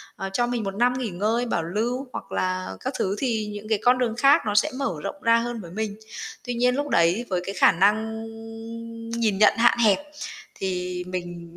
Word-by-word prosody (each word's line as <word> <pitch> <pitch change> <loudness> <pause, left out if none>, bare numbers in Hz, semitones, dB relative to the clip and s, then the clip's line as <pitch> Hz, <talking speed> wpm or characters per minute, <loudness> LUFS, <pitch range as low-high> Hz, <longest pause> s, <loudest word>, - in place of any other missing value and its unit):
ờ, 195 -3 -4
cho 240 +4 +2
mình 240 -2 -1
1 195 -1 -4
năm 245 +4 +3
nghỉ 250 -4 -2
ngơi, 215 +7 0
bảo 175 -8 -1
lưu 235 +10 -2
hoặc - - -7
là 185 - -1
các - - -3
thứ 195 +1 0
thì 225 -5 0
những 210 +1 -8
cái 215 -2 +2
con 250 +1 +5
đường 235 -3 0
khác 275 +3 +6
nó 205 - -1
sẽ 210 - +4
mở 275 -10 -1
rộng 295 - -5
ra 230 0 +5
hơn 235 -1 -2
với 170 -3 -10
mình. 210 +1 -3 0.5
Tuy 245 -1 -3
nhiên 250 +1 +2
lúc 290 +1 -2
đấy 170 +6 +3
với 180 -1 0
cái 195 - -4
khả - - +6
năng 220 +4 +1 0.9
nhìn 225 -4 +1
nhận 210 +1 +5
hạn 235 0 +5
hẹp 215 -4 +4 0.6
thì 180 -1 -3
mình 175 -2 -6
215 Hz, 215 wpm, -25 LUFS, 185-240 Hz, 0.9 s, khác